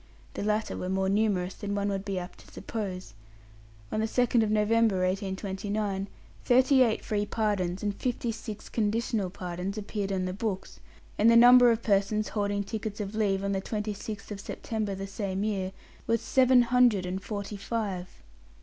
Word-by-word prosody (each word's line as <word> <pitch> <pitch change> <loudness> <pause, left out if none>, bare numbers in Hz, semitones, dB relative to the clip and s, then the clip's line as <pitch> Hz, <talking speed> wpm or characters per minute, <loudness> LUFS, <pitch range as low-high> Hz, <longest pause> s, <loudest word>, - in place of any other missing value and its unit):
The - - -4
latter 215 +1 0
were 185 - -4
more 190 0 +1
numerous 195 -3 +1
than 205 0 -4
one 200 0 0
would 195 -1 -2
be 195 -2 -3
apt 180 0 -6
to - - -17
suppose. 190 - -5 0.8
On - - -1
the 220 - +1
2nd 235 -2 +2
November, 215 0 +3
1829, 195 +1 -2 0.4
thirty 260 +2 +5
eight 230 -4 +2
free 210 -1 -1
pardons 195 -5 -1
and 205 -1 0
fifty 240 +1 -2
six 220 -1 -7
conditional 220 -2 0
pardons 180 +2 -5
appeared 205 -1 -3
on 185 -1 0
the 185 - -3
books; 195 -1 -4 0.4
and 220 - +6
the 230 - +6
number 245 +1 +8
of 230 0 +1
persons 210 +1 +1
holding 205 -1 -1
tickets 215 0 -5
of 205 0 -4
leave, 200 -3 +1
on 200 - 0
the 195 -1 -1
26th 210 0 -5
of 205 - -5
September 215 -1 -3
the 195 +1 -5
same 195 -1 -3
year, 195 -3 -1 0.4
was 230 0 +2
seven 255 0 +4
hundred 240 -6 +3
and 185 +1 -3
forty 205 +1 -5
five. 200 -3 -3
205 Hz, 170 wpm, -28 LUFS, 195-220 Hz, 0.8 s, number